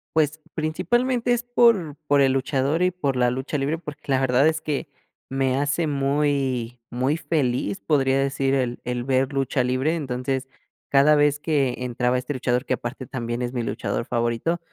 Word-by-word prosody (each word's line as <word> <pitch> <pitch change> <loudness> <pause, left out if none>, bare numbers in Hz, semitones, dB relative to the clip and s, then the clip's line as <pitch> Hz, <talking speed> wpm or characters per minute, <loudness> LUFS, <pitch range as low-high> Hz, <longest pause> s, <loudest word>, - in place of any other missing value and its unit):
Pues, 155 0 +1
principalmente 240 +10 +1
es 240 0 -1
por 230 - +3
por 145 -1 +4
el 135 -1 +4
luchador 135 +4 0
y 180 - +4
por 145 -7 -2
la 125 -1 +3
lucha 130 +4 -3
libre, 145 +4 -1
porque, 150 -3 -8
la 130 - +3
verdad 130 +2 +3
es 160 0 +1
que 150 0 -3 0.4
me 135 -1 0
hace 145 +4 0
muy 140 -4 0
muy 130 +6 0
feliz 125 -11 -1
podría 135 -1 +2
decir 135 0 +1
el 125 -2 -1
el 125 0 -2
ver 130 0 +1
lucha 135 -1 0
libre 130 +5 +1
entonces 130 -2 -2 0.4
cada 140 +2 +5
vez 145 -1 +3
que 140 -5 +1
entraba 125 0 0
este 125 +3 -3
luchador, 125 0 0
que - - 0
aparte 125 +1 -5
también 120 0 -4
es 120 +1 -3
mi 120 - -1
luchador - - -3
favorito 120 +8 -1
135 Hz, 175 wpm, -24 LUFS, 125-150 Hz, 0.4 s, cada